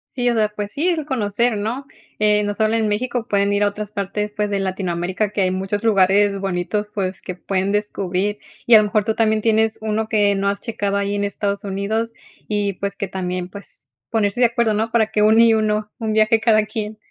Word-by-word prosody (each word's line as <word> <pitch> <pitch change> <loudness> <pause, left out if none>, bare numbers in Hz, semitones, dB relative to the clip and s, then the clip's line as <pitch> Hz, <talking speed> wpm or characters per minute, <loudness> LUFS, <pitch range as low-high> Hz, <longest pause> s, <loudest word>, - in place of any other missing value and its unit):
Sí, 245 -1 +1
o - - +2
sea, 215 -2 +2
pues 210 -1 -6
sí, 325 +6 +1
es 320 -4 -1
conocer, 235 -3 0
¿no? 230 +7 -3 0.3
Eh, 210 0 +3
no 205 0 -1
solo 220 +1 +1
en 220 -2 +1
México, 240 +2 -2
pueden 200 0 +2
ir 205 0 +2
a 205 - +3
otras 210 0 -7
partes, 210 +1 -3
pues, 210 -1 -1
de 200 -1 -1
Latinoamérica, 185 +1 -2
que 210 - -4
hay 185 -1 +2
muchos 195 +3 -3
lugares 200 -1 +4
bonitos, 195 +2 -2
pues, 190 -2 -3
que 185 - -6
pueden 190 +1 -1
descubrir. 205 -1 -1 0.3
Y 235 - +4
a - - +10
lo - - +3
mejor 210 0 0
tú 220 - 0
también 220 -1 +2
tienes 220 0 +2
1 220 0 -1
que 205 -2 +3
no 200 0 0
has 200 0 -2
checado 205 -3 -2
ahí 200 0 -1
en 205 - -1
Estados 200 0 -2
Unidos, 205 +4 -2 0.4
y 205 -1 0
pues, 200 +1 -4
que 200 - -3
también, 180 -1 -3
pues 200 +2 -10 0.2
ponerse 220 +1 0
de 245 - +7
acuerdo, 235 -2 +1
¿no? 220 +2 -1
Para 225 -2 +3
que 215 -1 0
uno 215 +2 +5
y 230 -1 +6
uno, 215 -1 0
1 220 -2 -2
viaje 220 +1 +3
cada 215 -2 +3
quien. 215 0 -5
210 Hz, 225 wpm, -20 LUFS, 200-220 Hz, 0.4 s, a